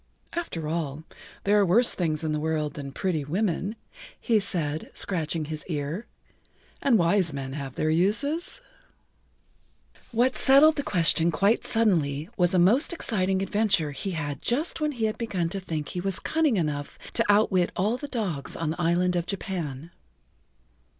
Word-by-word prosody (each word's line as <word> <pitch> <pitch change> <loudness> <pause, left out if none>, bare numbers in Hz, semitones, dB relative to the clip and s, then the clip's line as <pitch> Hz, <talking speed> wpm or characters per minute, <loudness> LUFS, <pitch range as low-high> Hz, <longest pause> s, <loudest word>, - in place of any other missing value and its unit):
"After 250 - -4
all, 155 -2 -3 0.4
there 205 +1 +4
are - - +5
worse 215 +7 +4
things 160 -3 -1
in 155 - -1
the 150 - -1
world 155 -1 -1
than 140 -2 -7
pretty 160 0 -1
women," 185 +5 -1 0.4
he 225 -2 +2
said, 160 -6 -3
scratching 165 -3 -2
his 155 0 -5
ear, 160 +6 -3 0.7
"and 255 -5 +4
wise 170 -2 +2
men 135 -1 -5
have 135 -3 -6
their 155 - 0
uses." 280 - +1 1.5
What 245 +3 +2
settled 290 +4 +6
the - - +1
question 170 - +3
quite 200 +7 +2
suddenly 165 -9 +1
was 180 -1 +2
a - - +4
most 220 - +4
exciting 190 - 0
adventure 195 -7 +1
he 170 +7 -5
had 145 -3 -4
just 300 +7 -1
when 300 -1 0
he 230 -4 -1
had 215 - -2
begun 185 -8 -1
to 195 +2 -3
think 160 -5 -4
he 180 - -4
was 195 0 -1
cunning 310 -8 +1
enough 150 -4 -2 0.2
to - - +2
outwit 200 -4 +3
all 210 +6 +1
the 290 - -7
dogs 200 - -3
on 165 -2 -2
the 175 - -4
Island 175 +2 +2
of 175 0 -1
Japan. 170 -6 -4
180 Hz, 165 wpm, -26 LUFS, 155-215 Hz, 1.5 s, settled